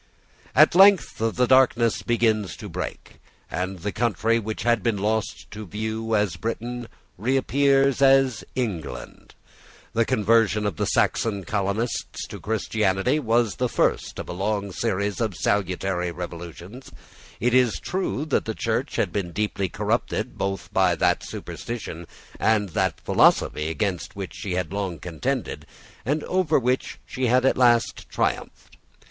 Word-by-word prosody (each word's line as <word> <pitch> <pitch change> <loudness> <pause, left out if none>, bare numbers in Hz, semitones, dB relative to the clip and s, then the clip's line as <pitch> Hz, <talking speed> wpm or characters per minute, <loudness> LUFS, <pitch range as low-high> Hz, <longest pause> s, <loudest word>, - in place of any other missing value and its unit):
At - - +7
length 195 -1 +5
the 115 +3 +1
darkness 125 -3 +4
begins 110 -8 +1
to - - -8
break; - - -7 0.3
and 95 +1 -3
the 100 +4 -3
country 115 +2 +1
which 110 +1 -4
had 120 -2 +2
been 110 +1 0
lost 110 +2 -2
to 105 -1 -8
view 110 +3 -2
as 105 -3 +1
Britain 120 +1 -4 0.3
reappears 135 +3 +2
as 135 -4 +4
England. 90 - -5 0.6
The 115 - +3
conversion 110 -1 +2
of 100 -6 -2
the - - 0
Saxon 100 -4 +1
colonists 100 +5 -2
to - - -8
Christianity 110 +3 0
was 115 -4 +1
the 125 -1 0
first - - 0
of - - -6
a - - -5
long 100 +2 -2
series 100 0 -1
of 110 -5 -1
salutary 90 -1 0
revolutions. 85 +7 -8 0.5
It 120 +1 +1
is 125 -3 +3
true 180 -5 -2
that 155 - 0
the - - -3
Church - - -2
had - - 0
been 95 -4 -2
deeply 100 -1 -1
corrupted - - -1
both 95 -2 -4
by 95 -2 +3
that - - +2
superstition 85 -8 -6 0.3
and 105 -3 +2
by - - -17
that - - 0
philosophy 75 +1 +3
against 95 +1 -2
which 100 -2 -6
she 100 - -5
had 90 0 -2
long 95 -4 -2
contended, 90 - -3 0.4
and 145 +7 -1
over 180 -4 +2
which 125 0 -1
she 130 -1 -2
had 125 +2 +3
at 135 - +4
last 120 -2 +2
triumphed. - - -3
110 Hz, 145 wpm, -24 LUFS, 95-125 Hz, 0.6 s, At